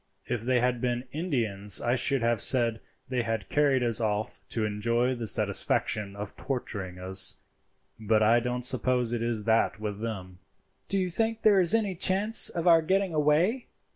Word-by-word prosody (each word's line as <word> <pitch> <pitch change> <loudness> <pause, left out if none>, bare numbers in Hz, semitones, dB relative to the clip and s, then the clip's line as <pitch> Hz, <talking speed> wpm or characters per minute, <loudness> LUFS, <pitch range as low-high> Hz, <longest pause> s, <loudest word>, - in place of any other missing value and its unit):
If 120 -2 -3
they 125 +2 +1
had 125 -1 0
been 120 -1 -1
Indians 115 - -1
I 120 - 0
should 135 -1 0
have 115 -2 +1
said 115 -3 +3 0.3
they 130 -2 0
had 115 -4 -4
carried 140 -3 +2
us 115 -1 +1
off 105 -1 -2
to 110 -2 -2
enjoy 115 +4 0
the 120 -3 -5
satisfaction 100 +1 -1
of 100 0 -7
torturing 100 -8 -5
us, 95 +1 +1 0.6
but 110 0 +2
I 115 +3 +4
don't 125 +1 -3
suppose 125 -1 +1
it 120 - -2
is 115 -2 -2
that 110 0 +1
with 105 -1 -5
them." 95 -5 -6 0.5
"Do 195 - -1
you 185 -2 -1
think 225 +4 -1
there 205 -3 +5
is 180 +3 +4
any 210 -4 0
chance 195 +5 +2
of 170 0 -4
our 165 -2 +6
getting 190 +2 0
away?" 155 - +1
120 Hz, 175 wpm, -27 LUFS, 110-155 Hz, 0.6 s, our